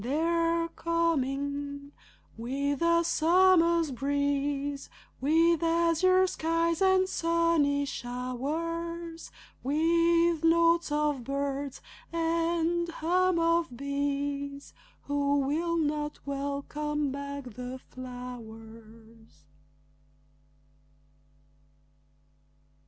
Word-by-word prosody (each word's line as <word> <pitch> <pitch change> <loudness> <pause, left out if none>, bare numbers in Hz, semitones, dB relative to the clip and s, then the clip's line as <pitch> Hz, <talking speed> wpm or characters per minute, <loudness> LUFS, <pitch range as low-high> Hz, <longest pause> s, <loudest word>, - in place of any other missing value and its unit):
They're 330 +5 +1
coming! 285 -4 -2 0.4
With 275 +5 -2
the 335 0 +3
summer's 335 -1 +4
breeze, 285 +1 -1 0.3
With 330 +4 +3
azure 335 +3 +3
skies 330 -1 0
and 380 -1 +4
sunny 335 -5 +1
showers, 325 +8 -4 0.3
With 335 +3 +2
notes 335 0 +3
of 295 -3 0
birds 275 +1 -3 0.3
and 335 +1 0
hum 355 +2 +1
of 335 -5 +1
bees 280 0 -3 0.3
Who 285 0 +1
will 330 +5 0
not 300 -1 -1
welcome 285 +1 -2
back 280 0 -5
the 250 +2 -6
flowers? 225 - -11
295 Hz, 70 wpm, -29 LUFS, 280-335 Hz, 0.4 s, summer's